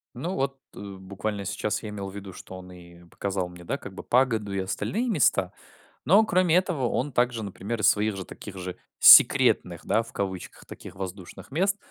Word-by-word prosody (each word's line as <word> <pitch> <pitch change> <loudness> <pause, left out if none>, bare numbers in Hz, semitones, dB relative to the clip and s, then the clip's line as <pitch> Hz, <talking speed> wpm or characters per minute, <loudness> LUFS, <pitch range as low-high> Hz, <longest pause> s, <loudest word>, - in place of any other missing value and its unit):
Ну 170 +10 -4
вот, 135 0 -2 0.2
э, - - -10
буквально 100 +1 -6
сейчас 105 +3 -3
я 105 - -5
имел 100 -2 -6
ввиду, 100 -1 -9
что 95 - -10
он 90 0 -12
и 85 -1 -15
показал 95 +1 -3
мне, 90 0 -13
да, - - -3
как - - -10
бы - - -9
погоду 115 -5 +1
и 100 - -1
остальные 200 - -2
места, 110 - +2 0.5
но 205 +6 +5
кроме 180 -4 +2
этого 170 -9 0
он 135 +2 -2
также, 120 -2 0
например, 100 +3 -5
из - - +3
своих 105 -1 +2
же 95 - -6
таких 100 -2 -10
же 90 0 -6 0.2
секретных - - +6
да, 115 - +1
в 115 - -14
кавычках 95 -2 -5
таких - - -11
воздушных, 95 -1 -8
мест. 195 +7 +1
100 Hz, 190 wpm, -26 LUFS, 95-130 Hz, 0.5 s, секретных